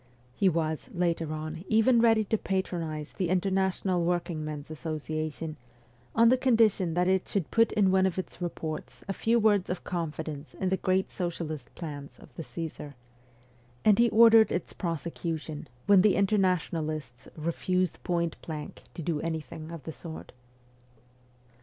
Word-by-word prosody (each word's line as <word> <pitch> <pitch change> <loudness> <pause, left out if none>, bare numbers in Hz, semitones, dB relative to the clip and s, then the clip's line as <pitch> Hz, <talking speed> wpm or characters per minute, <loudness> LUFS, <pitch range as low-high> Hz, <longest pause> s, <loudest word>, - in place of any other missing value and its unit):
He 195 - +4
was, 160 - -2
later 170 -3 0
on, 155 +2 -5
even 230 +2 +4
ready 225 -2 +5
to 220 +2 0
patronize 165 -5 -3
the 185 -4 -1
International 190 -1 +1
Workingmen's 155 -4 -2
Association, 155 0 -4 0.6
on 230 0 +6
the 255 - +5
condition 220 -9 +3
that 180 0 +2
it 190 0 +2
should 195 -6 -2
put 230 0 +4
in 200 -3 +3
one 190 0 +4
of 185 - -3
its 185 - -5
reports 160 -3 -5
a 195 - -1
few 230 +4 +2
words 210 -4 +3
of 180 - -3
confidence 160 -3 -4
in 190 - -1
the 190 - +1
great 185 +1 +1
socialist 165 -4 -4
plans 145 -4 -7
of - - -16
the - - -5
Csesar; 150 +1 -6 0.9
and 210 -1 +6
he 235 0 +6
ordered 225 0 +7
its 175 - -2
prosecution 165 -2 -4 0.2
when 200 -2 +7
the 205 0 +4
Internationalists 165 - 0
refused 175 +2 -1
point 170 -2 -1
blank 155 -2 -7
to 170 - -5
do 155 -2 -1
anything 160 -1 -5
of 165 -4 -8
the 160 - -5
sort. 160 0 -9
175 Hz, 150 wpm, -29 LUFS, 155-190 Hz, 0.9 s, ordered